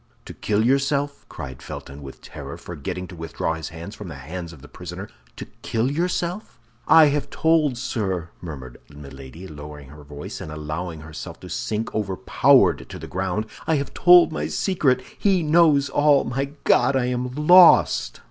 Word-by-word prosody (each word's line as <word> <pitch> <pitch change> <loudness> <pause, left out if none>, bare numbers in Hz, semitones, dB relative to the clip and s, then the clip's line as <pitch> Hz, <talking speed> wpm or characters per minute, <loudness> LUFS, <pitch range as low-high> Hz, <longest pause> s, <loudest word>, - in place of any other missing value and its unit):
"To - - -9
kill 105 +1 0
yourself?" 140 +2 0
cried 65 -2 -8
Felton, 70 +2 -9
with 70 -1 -11
terror, - - -9
forgetting 90 +2 -6
to 90 - -10
withdraw 80 0 -3
his 80 -2 -6
hands 85 +4 -9
from 105 - -9
the 80 - -8
hands 85 +5 -7
of 75 -5 -15
the - - -11
prisoner, 90 +4 -8 0.3
"to - - -7 0.2
kill 115 +4 -1
yourself?" 175 +4 -3 0.3
"I 160 -2 +7
have 140 -1 -2
told, 155 -5 +2
sir," 95 -9 -3
murmured 65 -8 -9
Milady, 70 +3 -11
lowering 75 -3 -10
her 75 +1 -13
voice, 75 0 -8
and 80 - -7
allowing 75 +2 -5
herself 80 0 -9
to - - -10
sink 110 +1 -3
overpowered 100 -3 +2
to - - -8
the - - -8
ground; 95 +3 -2 0.2
"I 160 - +2
have 140 -1 -3
told 175 0 +6
my 75 0 -3
secret! 130 - 0 0.2
He 190 -4 +2
knows 155 -3 +4
all! 145 -1 +3
My 135 +3 -2 0.2
God, 140 - +3
I 130 -2 +1
am 125 0 -3
lost!" 150 - +5
95 Hz, 170 wpm, -23 LUFS, -, 0.3 s, I